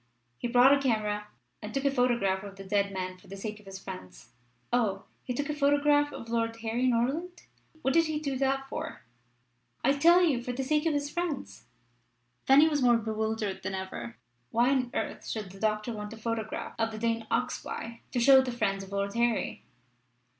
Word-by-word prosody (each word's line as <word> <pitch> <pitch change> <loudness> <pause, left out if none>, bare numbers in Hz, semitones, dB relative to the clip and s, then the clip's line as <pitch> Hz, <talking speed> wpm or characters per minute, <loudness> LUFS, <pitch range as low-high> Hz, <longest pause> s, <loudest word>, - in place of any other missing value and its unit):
He - - -2
brought 245 +3 +6
a 280 - +4
camera 210 -5 0 0.3
and 210 - -6
took 275 +1 -1
a 280 - +4
photograph 235 -7 +1
of 200 -1 -9
the 195 - -9
dead 200 0 +1
man 185 -1 -4
for - - -19
the 195 - -8
sake 210 +1 -5
of 210 - -19
his 195 0 -7
friends." 190 - -10 0.4
"Oh! 205 -5 +1 0.2
he - - -4
took 280 +3 -2
a 300 - -1
photograph 290 0 +3
of - - -7
of 230 - -13
Lord 230 -1 0
Harry 230 +3 0
Norland. 275 +10 0 0.4
What 265 - +2
did 330 +1 +5
he 310 -1 -1
do 280 -3 -2
that 270 0 0
for?" 310 +3 -6 0.8
"I 275 - +4
tell 340 +5 +6
you: 280 -8 +2
for 245 +1 -4
the 265 +2 -2
sake 300 +4 +1
of 310 - +1
his 290 0 -2
friends." 345 -5 -4 0.8
Fanny 285 +4 +7
was 295 -3 +1
more 240 -2 +5
bewildered 220 -2 -2
than 195 - -3
ever. 190 -12 -6 0.3
Why 240 - +3
on 255 -3 +1
earth - - -3
should 210 -4 -4
the 195 - -13
doctor 215 +2 0
want 210 0 -6
a - - -9
photograph 220 -1 -3
of 225 0 +2
the 220 - -7
Dane 230 0 -1
Oxbye 230 0 -3
to 250 - 0
show 265 +2 +8
the 260 -1 -3
friends 200 -5 -1
of 195 - -12
Lord 200 0 -1
Harry? 235 -1 0
235 Hz, 205 wpm, -29 LUFS, 210-275 Hz, 0.8 s, show